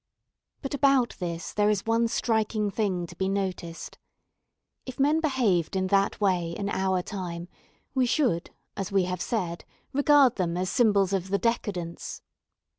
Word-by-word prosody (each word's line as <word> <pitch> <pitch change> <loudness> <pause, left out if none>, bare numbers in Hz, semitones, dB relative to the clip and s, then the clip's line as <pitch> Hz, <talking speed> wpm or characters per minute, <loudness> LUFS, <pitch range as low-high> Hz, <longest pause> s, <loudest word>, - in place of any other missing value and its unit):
But 270 - -4
about 275 -3 +3
this 170 -1 -4
there 210 0 +3
is 205 -2 0
one 230 +1 +2
striking 220 -2 0
thing 190 -4 -1
to 175 - -12
be 190 +2 -1
noticed. 185 -4 -4 0.8
If 260 0 -9
men 295 +4 +3
behaved 235 - +1
in 190 0 +1
that 195 0 +2
way 180 -5 +1
in 200 +3 -3
our 190 -2 0
time, 175 -3 -5 0.5
we 260 -2 +2
should, 240 - +1 0.3
as 195 +1 -4
we 195 -1 +3
have 180 0 -3
said, 180 -7 -2 0.3
regard 285 -2 +5
them 175 -2 -1
as 185 0 -1
symbols 200 -5 +3
of 190 -1 -1
the 200 - +2
'decadence.' 200 -7 -3
200 Hz, 155 wpm, -27 LUFS, 180-235 Hz, 0.8 s, regard